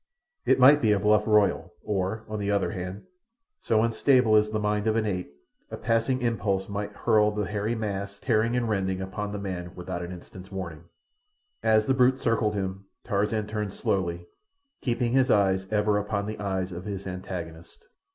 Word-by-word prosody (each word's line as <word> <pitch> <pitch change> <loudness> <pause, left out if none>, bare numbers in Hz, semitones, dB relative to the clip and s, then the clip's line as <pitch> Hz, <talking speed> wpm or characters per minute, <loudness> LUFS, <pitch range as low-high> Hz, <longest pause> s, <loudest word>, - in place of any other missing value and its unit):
It - - +5
might 140 +3 +7
be 110 - +3
a 100 - +1
bluff 105 +1 +3
royal, 105 -2 +2
or, 100 +2 -2
on 110 -1 -4
the 100 0 -2
other 100 0 +1
hand, 90 0 -6 0.6
so 110 -1 +2
unstable 115 0 +3
is 105 0 +4
the 110 - -1
mind 105 0 0
of 110 - +2
an 115 -1 +1
ape, 90 -7 -3 0.4
a - - -6
passing 115 +3 0
impulse 100 -5 0
might 100 0 -4
hurl 105 0 +3
the 105 -1 -2
hairy 105 +3 -2
mass, 100 -2 -4
tearing 115 +1 +1
and 120 -1 0
rending, 95 -3 -1
upon 100 +2 -4
the 105 - -4
man 90 -3 -5
without 90 0 -5
an 85 0 -6
instant's 90 +2 -11
warning. 85 -5 -6 0.8
As 110 -1 +3
the 135 - +2
brute 130 0 +4
circled 115 -4 +1
him 95 0 -4 0.2
Tarzan 105 0 0
turned 105 -2 -4
slowly, 85 -6 -1 0.6
keeping 120 -1 0
his 130 -1 +3
eyes 95 -2 +3
ever 105 -1 +2
upon 100 0 -2
the 110 +1 -5
eyes 95 -2 -2
of 90 +1 -7
his 100 -2 -5
antagonist. 90 -3 -7
105 Hz, 180 wpm, -27 LUFS, 95-110 Hz, 0.8 s, might